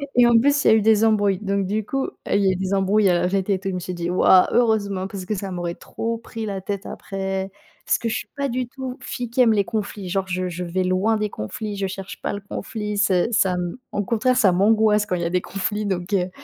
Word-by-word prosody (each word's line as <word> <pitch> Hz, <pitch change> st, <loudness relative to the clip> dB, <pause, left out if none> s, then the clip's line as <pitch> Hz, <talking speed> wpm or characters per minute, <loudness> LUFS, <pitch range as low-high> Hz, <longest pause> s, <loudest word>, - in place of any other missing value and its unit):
et 245 Hz, -, +6 dB
en 235 Hz, -1 st, +5 dB
plus 285 Hz, +3 st, +2 dB
il -, -, +5 dB
y -, -, +7 dB
a -, -, +7 dB
eu 220 Hz, -, +3 dB
des 220 Hz, 0 st, +4 dB
embrouilles 205 Hz, -3 st, +2 dB
donc, 200 Hz, -1 st, -1 dB
du 210 Hz, +2 st, -2 dB
coup, 270 Hz, +4 st, -2 dB, 0.2 s
il 200 Hz, -, +2 dB
y -, -, +4 dB
a -, -, +4 dB
eu 185 Hz, -, -1 dB
des 190 Hz, +1 st, -2 dB
embrouilles, 195 Hz, +2 st, +3 dB
heu, -, -, +4 dB
à 175 Hz, 0 st, +2 dB
la 180 Hz, -, +1 dB
fête 195 Hz, +1 st, -1 dB
et 190 Hz, -2 st, +2 dB
tout 195 Hz, -, -3 dB
je -, -, -3 dB
me -, -, -2 dB
suis 180 Hz, +1 st, -5 dB
dit: 170 Hz, 0 st, -3 dB
«Waouh, 185 Hz, 0 st, +5 dB
heureusement!» 200 Hz, -5 st, +1 dB
parce 195 Hz, -2 st, -7 dB
que 215 Hz, -, -2 dB
ça 195 Hz, 0 st, -5 dB
m'aurait 175 Hz, -1 st, -3 dB
trop 230 Hz, 0 st, -4 dB
pris 225 Hz, 0 st, -7 dB
la 195 Hz, -2 st, -4 dB
tête 200 Hz, +1 st, -4 dB
après 195 Hz, -1 st, -4 dB, 0.3 s
parce -, -, +2 dB
que 230 Hz, -, -4 dB
je 225 Hz, -, -1 dB
suis -, -, -7 dB
pas 280 Hz, -1 st, -1 dB
du 250 Hz, +1 st, -2 dB
tout, 260 Hz, +1 st, -7 dB
fille 245 Hz, -2 st, -5 dB
qui 255 Hz, -, +2 dB
aime 235 Hz, -2 st, +5 dB
les 200 Hz, -2 st, +2 dB
conflits, 205 Hz, -3 st, -4 dB
genre, 190 Hz, 0 st, -1 dB
je 185 Hz, 0 st, -2 dB
je 180 Hz, 0 st, -5 dB
vais 180 Hz, +2 st, -1 dB
loin 190 Hz, +5 st, +1 dB
des 210 Hz, -1 st, -2 dB
conflits, 205 Hz, -, -5 dB
je 195 Hz, -1 st, -2 dB
cherche 195 Hz, 0 st, -8 dB
pas -, -, -2 dB
le 200 Hz, -, -5 dB
conflit, 210 Hz, -1 st, -4 dB
c'est 200 Hz, +2 st, +2 dB
ça 190 Hz, -3 st, +3 dB
m 180 Hz, +4 st, -3 dB
au 205 Hz, -, -1 dB
contraire, 250 Hz, +5 st, +1 dB
ça 195 Hz, -5 st, +5 dB
m'angoisse 210 Hz, +2 st, +3 dB
quand 180 Hz, -, 0 dB
il 175 Hz, -, -2 dB
y 170 Hz, -, -1 dB
des 180 Hz, -, +1 dB
conflits, 205 Hz, +3 st, -3 dB
donc 185 Hz, +1 st, -3 dB
heu 185 Hz, -2 st, +1 dB
200 Hz, 280 wpm, -22 LUFS, 185-220 Hz, 0.3 s, y